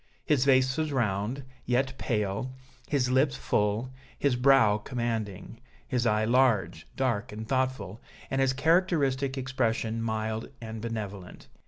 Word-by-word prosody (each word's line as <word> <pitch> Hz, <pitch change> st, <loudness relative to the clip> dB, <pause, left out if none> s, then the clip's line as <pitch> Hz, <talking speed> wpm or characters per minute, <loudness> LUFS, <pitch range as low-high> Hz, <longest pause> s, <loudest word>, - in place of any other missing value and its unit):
His 140 Hz, -4 st, +2 dB
face 130 Hz, -1 st, +4 dB
was 155 Hz, -1 st, -1 dB
round, 115 Hz, +1 st, -1 dB, 0.2 s
yet 130 Hz, +2 st, +1 dB
pale, 105 Hz, +2 st, -1 dB, 0.4 s
his 130 Hz, -4 st, +1 dB
lips 130 Hz, +1 st, +3 dB
full, 105 Hz, +5 st, 0 dB, 0.2 s
his 140 Hz, -3 st, +2 dB
brow 125 Hz, -5 st, +5 dB
commanding, 115 Hz, -4 st, -4 dB, 0.3 s
his 120 Hz, -1 st, 0 dB
eye 105 Hz, 0 st, +2 dB
large, 120 Hz, -4 st, +2 dB
dark 125 Hz, -2 st, -1 dB
and 110 Hz, +1 st, -7 dB
thoughtful, 130 Hz, -6 st, -1 dB, 0.3 s
and 135 Hz, -, +1 dB
His 135 Hz, -1 st, +3 dB
characteristic 140 Hz, -3 st, +2 dB
expression 115 Hz, -4 st, -1 dB
mild 110 Hz, 0 st, -2 dB
and 110 Hz, -1 st, -7 dB
benevolent. 105 Hz, -5 st, -6 dB
125 Hz, 130 wpm, -28 LUFS, 110-135 Hz, 0.4 s, brow